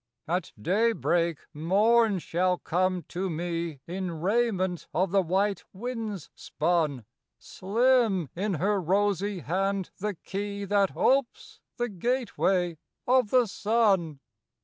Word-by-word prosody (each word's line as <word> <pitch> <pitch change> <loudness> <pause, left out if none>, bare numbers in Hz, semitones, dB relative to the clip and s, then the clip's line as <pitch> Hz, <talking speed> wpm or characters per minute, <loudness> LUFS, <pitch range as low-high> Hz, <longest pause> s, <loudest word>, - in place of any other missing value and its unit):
At 180 +3 -1
daybreak 175 - +1 0.2
Morn 205 +7 +3
shall 180 +1 0
come 185 +1 0
to 185 +2 -3
me 165 -3 -3
In 175 -2 -4
raiment 190 -2 0
of 180 +2 +1
the 195 0 +4
white 195 +3 0
winds 220 - -5
spun; 155 -7 -1 0.3
Slim 220 - +1
in 195 +2 -1
her 195 +4 +1
rosy 200 +1 0
hand 190 +6 -1
the 210 0 -2
key 200 +3 -5
That 200 -1 +1
opes 430 - +1 0.2
the 240 -1 0
gateway 195 - 0 0.3
of 250 -3 +3
the 250 0 +4
sun. 200 -8 +1
195 Hz, 115 wpm, -27 LUFS, 175-215 Hz, 0.3 s, the